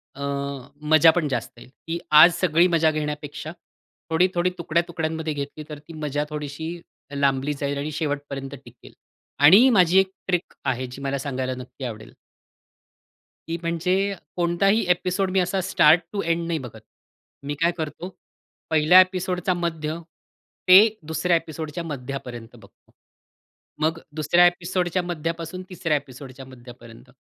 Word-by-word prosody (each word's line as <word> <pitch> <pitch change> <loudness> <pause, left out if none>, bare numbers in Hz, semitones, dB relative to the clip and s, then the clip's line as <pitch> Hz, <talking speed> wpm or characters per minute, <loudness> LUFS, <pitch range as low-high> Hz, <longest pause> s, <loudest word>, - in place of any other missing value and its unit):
अ, 140 - -7 0.7
मजा 155 +1 +7
पण 170 -3 -1
जास्त 120 -4 -3
येईल. 120 - -14
ती 165 +4 -6
आज 160 +3 +8
सगळी 170 0 +3
मजा 165 -2 +3
घेण्यापेक्षा 150 0 -5 0.6
थोडी-थोडी 180 +2 +2
तुकड्या-तुकड्यांमध्ये 160 -1 -2
घेतली 145 +1 -6
तर 150 -1 -7
ती 155 +3 -14
मजा 150 -1 -2
थोडीशी 150 +1 -5 0.5
लांबली 140 0 +1
जाईल 140 0 -1
आणि 145 +2 -3
शेवटपर्यंत 145 -2 -4
टिकेल 120 0 -16 0.5
आणि 205 - +8
माझी 185 -5 +5
एक 190 0 +1 0.2
ट्रिक 180 -1 -1
आहे 130 -1 -1
जी 130 +2 -10
मला 140 0 -2
सांगायला 130 -2 -3
नक्की 130 +1 -9
आवडेल. 110 -3 -8 1.3
ती 165 +1 -3
म्हणजे 180 +4 0 0.2
कोणताही 195 +5 +2
एपिसोड 180 +2 +1
मी 190 - +2
असा 180 +2 0
स्टार्ट 165 -2 +4
टू 200 - -1
एंड 170 0 -1
नाही 165 -2 -1
बघत. 120 -4 -10 0.6
मी 145 +1 -3
काय 170 +1 +4
करतो? 160 +3 -5 0.6
पहिल्या 160 +3 +6
एपिसोडचा 185 0 -1
मध्य 165 -2 -3 0.7
ते 185 +1 +10 0.3
दुसऱ्या 170 +2 +1
एपिसोडच्या 160 0 -6
मध्यापर्यंत 125 -5 -7
बघतो. 100 -3 -20 0.9
मग 160 +1 0 0.2
दुसऱ्या 160 +3 +4
एपिसोडच्या 175 0 -1
मध्यापासून 170 +1 -4
तिसऱ्या 170 -5 0
एपिसोडच्या 135 -1 -10
मध्यापर्यंत. 120 -1 -14
160 Hz, 135 wpm, -23 LUFS, 140-175 Hz, 1.3 s, ते